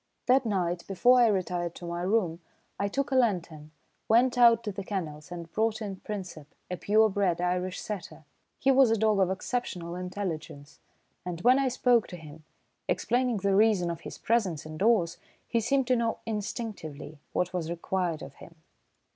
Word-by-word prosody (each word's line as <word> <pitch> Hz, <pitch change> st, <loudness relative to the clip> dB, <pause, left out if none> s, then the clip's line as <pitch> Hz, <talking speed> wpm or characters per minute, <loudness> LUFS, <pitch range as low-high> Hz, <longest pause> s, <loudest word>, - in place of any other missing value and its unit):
That 255 Hz, -1 st, +3 dB
night, 180 Hz, -4 st, -1 dB
before 245 Hz, +6 st, +4 dB
I 235 Hz, -, +6 dB
retired 180 Hz, -4 st, -1 dB
to 175 Hz, -, -9 dB
my 170 Hz, 0 st, -4 dB
room, 180 Hz, -3 st, 0 dB, 0.4 s
I 200 Hz, -, +1 dB
took 275 Hz, +7 st, -2 dB
a -, -, +1 dB
lantern, 175 Hz, -11 st, 0 dB, 0.4 s
went 240 Hz, +3 st, +4 dB
out 235 Hz, -2 st, +6 dB
to 210 Hz, -, -3 dB
the 195 Hz, 0 st, -6 dB
kennels 170 Hz, -5 st, -5 dB
and 170 Hz, -1 st, -7 dB
brought 220 Hz, +2 st, 0 dB
in 200 Hz, -3 st, -5 dB
Princep, 180 Hz, -8 st, -7 dB, 0.2 s
a 180 Hz, -, -2 dB
pure 215 Hz, +4 st, +4 dB
bred 190 Hz, -4 st, 0 dB
Irish 180 Hz, +1 st, -1 dB
setter. 185 Hz, -6 st, -7 dB, 0.3 s
He 270 Hz, -, +3 dB
was 265 Hz, -2 st, +6 dB
a 225 Hz, -, +2 dB
dog 215 Hz, -1 st, +2 dB
of 190 Hz, -2 st, +3 dB
exceptional 185 Hz, -4 st, -3 dB
intelligence, 180 Hz, -6 st, -6 dB, 0.4 s
and 175 Hz, -1 st, -5 dB
when 255 Hz, +6 st, +5 dB
I 275 Hz, -, +2 dB
spoke 245 Hz, -2 st, +2 dB
to 180 Hz, -, -8 dB
him, 155 Hz, -1 st, -12 dB, 0.5 s
explaining 245 Hz, -1 st, +1 dB
the 200 Hz, 0 st, +1 dB
reason 200 Hz, -5 st, +3 dB
of 170 Hz, 0 st, -7 dB
his -, -, -8 dB
presence 195 Hz, -10 st, 0 dB
indoors, 170 Hz, +2 st, +1 dB, 0.3 s
he 235 Hz, -, +1 dB
seemed 265 Hz, +4 st, +1 dB
to 255 Hz, 0 st, +2 dB
know 230 Hz, -1 st, 0 dB
instinctively 205 Hz, -, -5 dB
what 180 Hz, 0 st, -1 dB
was 170 Hz, -3 st, -2 dB
required 170 Hz, -1 st, -2 dB
of 135 Hz, -, -9 dB
him. 165 Hz, -, -14 dB
195 Hz, 175 wpm, -28 LUFS, 170-225 Hz, 0.5 s, I